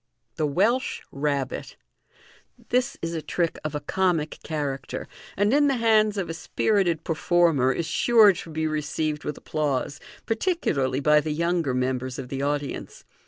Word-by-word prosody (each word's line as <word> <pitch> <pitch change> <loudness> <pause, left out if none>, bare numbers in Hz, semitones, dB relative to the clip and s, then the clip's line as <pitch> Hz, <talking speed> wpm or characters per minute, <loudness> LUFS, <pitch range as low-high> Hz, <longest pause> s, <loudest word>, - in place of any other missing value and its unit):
Tub 150 -3 -1
Welsh 235 +8 +1
Rabbit. 140 -2 -2 0.5
— - - -27
This 250 +2 +1
is 165 0 -2
a 160 - -2
trick 170 +1 -1
of 155 -1 -3
a - - -1
comic 165 -1 0
character, 140 -4 -4 0.3
and 205 +4 +3
in 290 0 +5
the 275 - +2
nands 215 -3 +3
of 195 - -1
a 165 - -4
spirited 175 -1 0
performer 165 -5 +2
is 170 - -2
sure 215 +5 +5
to 170 - -8
be 160 0 -2
received 155 0 -2
with 150 - -4
applause, 145 -2 -2 0.3
particularly 175 - 0
by 150 +1 +5
the 155 - -4
younger 165 -3 0
members 130 0 -1
of 125 - -6
the 135 0 -3
audience. 145 0 -3
155 Hz, 160 wpm, -25 LUFS, 145-190 Hz, 0.5 s, in